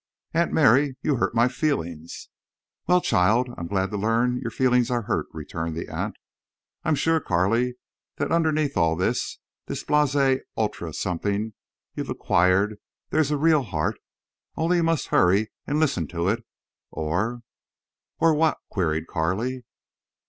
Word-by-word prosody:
"Aunt 170 +1 +2
Mary, 140 -1 +4
you 145 -4 +1
hurt 115 - 0
my 115 +2 +5
feelings." 85 - -3 0.6
"Well, 180 +1 +4
child, 110 - +2
I'm 85 - -5
glad 95 +1 -1
to 105 - -2
learn 115 +4 +1
your 115 - -3
feelings 125 0 +2
are 120 -2 0
hurt," - - -1
returned 80 +1 -5
the - - -5
aunt. - - -3 0.7
"I'm 155 - +2
sure, 160 +3 +2
Carley, 115 - +1 0.4
that - - -2
underneath 155 -3 +1
all 80 -3 +3
this—this 90 - -3
blasé 140 -3 +3 0.2
ultra 105 -6 -2
something 100 +6 -2 0.4
you've - - -5
acquired, 95 +4 +2 0.3
there's 155 -3 +2
a 150 - +1
real 155 0 +4
heart. 80 -11 -2 0.6
Only 170 +2 +1
you 170 - +2
must 165 -2 0
hurry 100 +4 +3 0.2
and 150 +1 0
listen 135 - +1
to 85 +2 -1
it—or—" 110 0 -4 0.8
"Or 165 0 +5
what?" 155 +1 +2
queried 80 -4 0
Carley. 110 +12 -2
115 Hz, 140 wpm, -25 LUFS, 90-145 Hz, 0.8 s, my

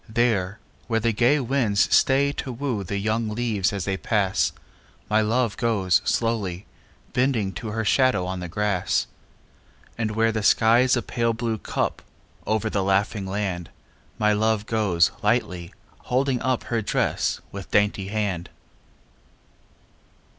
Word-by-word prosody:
There, 110 -4 +1 0.3
where 115 -2 +1
the 115 +1 +1
gay 125 +7 +3
winds 120 -6 +2
stay 140 +1 +3
to 140 -2 -5
woo 120 -4 -3
The 100 +2 -3
young 110 +2 -1
leaves 110 -2 0
as 100 -3 -3
they 95 -1 -1
pass, 100 -2 +1 0.6
My 110 +1 +4
love 115 0 0
goes 95 -6 +2
slowly, 105 -4 -1 0.5
bending 125 -6 +1
to 115 - -6
Her 110 +1 -2
shadow 130 -5 +3
on 95 0 -4
the 90 - -5
grass; 100 +1 0 0.9
And 110 -2 -1
where 115 0 +3
the 110 - -2
skyâs 120 +4 +4
a 120 - -2
pale 115 -1 0
blue 115 -1 -2
cup - - -2 0.5
Over 110 0 0
the 105 -2 0
laughing 100 +1 0
land, 95 -4 -3 0.5
My 105 0 +3
love 110 0 +1
goes 100 -8 +2
lightly, 85 -1 0 0.3
holding 130 0 0
up 130 -2 0
Her 115 -2 -1
dress 105 - 0
with 100 -1 -8
dainty 105 -1 +1
hand. 100 -4 -2
110 Hz, 140 wpm, -24 LUFS, 100-115 Hz, 0.9 s, My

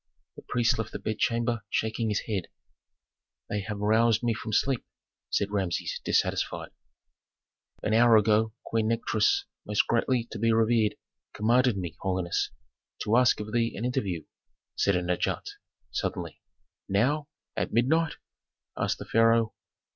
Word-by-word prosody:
The - - -10
priest 120 -2 +1
left 110 -1 -4
the - - -2
bedchamber 115 +3 0
shaking 110 0 -1
his 105 - 0
head. 100 -6 -3 1.0
"They 105 - 0
have 105 +1 -5
roused 110 +2 +3
me 120 -1 +2
from 110 0 -6
sleep!" 130 +4 +1 0.5
said 100 0 0
Rameses, 95 -4 -2
dissatisfied. - - 0 1.1
"An 110 - 0
hour 115 0 +6
ago 110 +1 +3
Queen 110 -1 0
Nikotris, 110 -2 +1 0.2
most 105 0 +1
greatly 120 +1 +1
to - - -6
be 115 +1 +3
revered, 110 -1 +3 0.4
commanded 120 +1 +3
me, 85 -3 -4
holiness, 90 -2 -1 0.5
to 105 - +2
ask 125 -2 +4
of 105 +1 -7
thee 115 -1 +1
an 110 - -3
interview," 100 - -1 0.5
said 100 - +2
an 90 0 0
adjutant, 90 - -1 0.4
suddenly. - - -4 0.5
"Now? 135 +10 +1 0.3
At - - -2
midnight?" 155 +8 +2 0.6
asked - - -1
the - - -8
pharaoh. 115 0 +3
110 Hz, 140 wpm, -28 LUFS, 105-120 Hz, 1.1 s, hour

